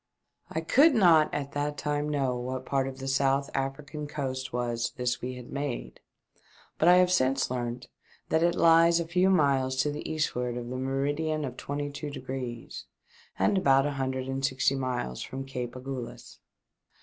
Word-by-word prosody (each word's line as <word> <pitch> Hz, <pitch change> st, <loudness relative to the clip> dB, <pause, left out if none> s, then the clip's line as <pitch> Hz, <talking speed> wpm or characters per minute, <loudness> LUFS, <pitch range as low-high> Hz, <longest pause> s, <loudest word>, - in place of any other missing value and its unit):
I 160 Hz, -, -2 dB
COULD 280 Hz, -, +5 dB
not 170 Hz, -7 st, +5 dB
at 140 Hz, -1 st, -3 dB
that 145 Hz, 0 st, -2 dB
time 150 Hz, 0 st, -1 dB
know 135 Hz, -4 st, 0 dB
what 130 Hz, +1 st, -4 dB
part 135 Hz, -1 st, 0 dB
of 135 Hz, 0 st, -6 dB
the 135 Hz, 0 st, -6 dB
South 135 Hz, +1 st, +1 dB
African 145 Hz, +2 st, -4 dB
coast 130 Hz, -3 st, -4 dB
was 120 Hz, -1 st, -2 dB
this 125 Hz, 0 st, -1 dB
we 125 Hz, +1 st, -4 dB
had 125 Hz, -1 st, -10 dB
made, 135 Hz, -, -4 dB, 0.8 s
but 160 Hz, -, +3 dB
I 180 Hz, -, +8 dB
have 180 Hz, 0 st, +4 dB
since 135 Hz, -6 st, +2 dB
learnt 120 Hz, 0 st, -3 dB, 0.4 s
that 160 Hz, -, +2 dB
it 170 Hz, 0 st, +3 dB
lies 165 Hz, 0 st, +5 dB
a 170 Hz, -, -1 dB
few 180 Hz, +3 st, +2 dB
miles 140 Hz, -7 st, +2 dB
to 150 Hz, -, -1 dB
the 150 Hz, -, -5 dB
eastward 125 Hz, -6 st, -1 dB
of 120 Hz, -1 st, -5 dB
the 130 Hz, -, -4 dB
meridian 145 Hz, +4 st, -1 dB
of 125 Hz, -2 st, -6 dB
twenty 145 Hz, +2 st, -4 dB
two 145 Hz, +1 st, -5 dB
degrees, 130 Hz, -3 st, -6 dB, 0.5 s
and 200 Hz, -, +3 dB
about 135 Hz, -4 st, +4 dB
an 145 Hz, -, -1 dB
hundred 130 Hz, -1 st, -2 dB
and 135 Hz, 0 st, -3 dB
sixty 135 Hz, +1 st, +2 dB
miles 125 Hz, -, -3 dB
from 135 Hz, +1 st, -6 dB
Cape 125 Hz, -3 st, -5 dB
Agulhas. 130 Hz, -1 st, -7 dB
135 Hz, 175 wpm, -28 LUFS, 130-150 Hz, 0.8 s, I